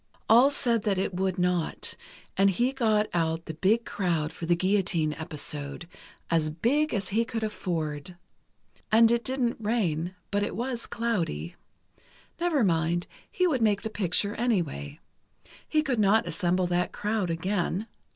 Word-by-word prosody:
All 240 +5 +7
said 240 -5 +2
that 200 -2 0
it 190 0 -1
would 190 +1 -1
not, 180 -2 -1 0.4
and 195 +1 +4
he 240 +7 +1
got 220 -5 +2
out 165 -1 0
the 160 - -5
big 210 +8 +2
crowd 165 -5 -1
for 165 - -6
the 175 - +4
guillotine 175 -4 +1
episode, 150 0 -5 0.4
as 160 -2 +2
big 255 - +1
as 200 -4 -2
he 225 +3 +2
could 225 -1 -4
afford. 170 -6 -3 0.8
And 225 +1 +6
it 235 0 +1
didn't 255 -2 -1
rain, 185 -6 -1 0.2
but 205 0 +1
it 205 - -2
was 240 0 -3
cloudy. 175 - -2 0.8
Never 335 -7 +2
mind, 170 -1 +1 0.3
he 365 - +1
would 280 -9 +1
make 205 -2 +2
the 220 - -4
picture 200 +1 0
anyway. 170 - -1 0.7
He 305 0 +2
could 260 -6 -1
not 210 +2 +4
assemble 180 -1 +1
that 175 0 0
crowd 210 -3 -1
again. 180 +3 -1
195 Hz, 150 wpm, -27 LUFS, 170-230 Hz, 0.8 s, All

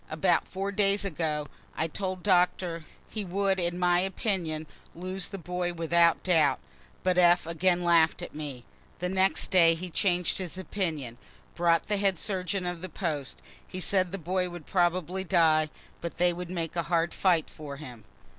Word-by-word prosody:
About - - +2
four 195 +1 -3
days 200 0 +1
ago, 155 -4 -2 0.3
I 160 - 0
told 185 +2 -4
Doctor 180 -3 +2 0.2
he 215 - -5
would 195 +1 0
in 175 0 -1
my 175 -1 +3
opinion 180 -4 -1 0.3
lose 185 +1 -3
the 195 - -7
boy 180 0 -3
without 170 0 +3
doubt 155 -7 +3 0.4
but 185 -1 +2
F. 175 0 +5
again 175 +2 +1
laugh'd 170 -2 +3
at - - -8
me. 145 -5 -6 0.3
The 180 +1 -2
next 190 +1 +1
day 165 -3 +6
he 175 +2 -7
changed 180 0 +1
his 185 -1 -5
opinion 160 - -3 0.3
brought 170 -1 +2
the 210 - -1
head 195 -2 +2
surgeon 185 +1 -2
of 175 -2 -3
the 185 - -6
post 150 -6 -4 0.2
he 185 - -6
said 185 -1 +2
the 195 - -3
boy 180 +1 -1
would 175 -3 -9
probably 180 0 0
die, 160 -4 +3 0.3
but 170 - -5
they 175 0 +3
would 175 0 -6
make 170 -3 -3
a 170 - +1
hard 170 -1 +1
fight 175 -5 +2
for 145 -2 -9
him. 125 -7 -10
175 Hz, 175 wpm, -28 LUFS, 165-185 Hz, 0.4 s, day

